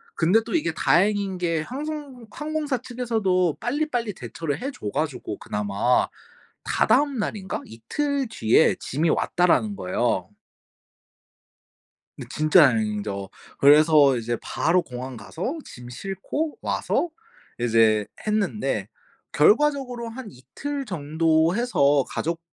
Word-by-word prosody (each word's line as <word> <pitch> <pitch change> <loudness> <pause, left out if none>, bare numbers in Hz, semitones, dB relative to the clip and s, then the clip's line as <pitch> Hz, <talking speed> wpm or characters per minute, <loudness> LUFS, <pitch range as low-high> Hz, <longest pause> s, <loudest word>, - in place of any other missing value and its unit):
근데 180 +7 +3
또 230 - -6
이게 305 - 0
다행인 195 +3 +2
게 165 -3 0
항송 275 - -6
항공사 300 -2 -2
측에서도 220 - 0
빨리빨리 245 -5 -1
대처를 145 - -5
해 275 +3 -3
줘 105 - -6
가지고 145 -7 -3
그나마 105 +4 0 0.6
다다음 285 -2 +2
날인가 200 -3 -3
이틀 275 - -2
뒤에 115 - +3
짐이 155 +5 -1
왔다라는 180 +4 +2
거예요. 95 -1 -1 1.9
네 - - -8
진짜 155 +1 +5
다행이죠. 105 -4 -2 0.3
그래서 145 -2 +6
이제 120 0 -2
바로 175 +2 +1
공항 125 0 -7
가서 175 - -5
짐 125 0 -11
싣고 195 - -4
와서 345 - -1 0.5
이제 110 -3 +3 0.2
했는데 215 0 -1 0.4
결과적으로 275 - +2
한 235 -1 -8
이틀 270 - -6
정도 160 - +1
해서 145 - +3
가족 165 +1 -3
175 Hz, 250 characters per minute, -24 LUFS, -, 1.9 s, 그래서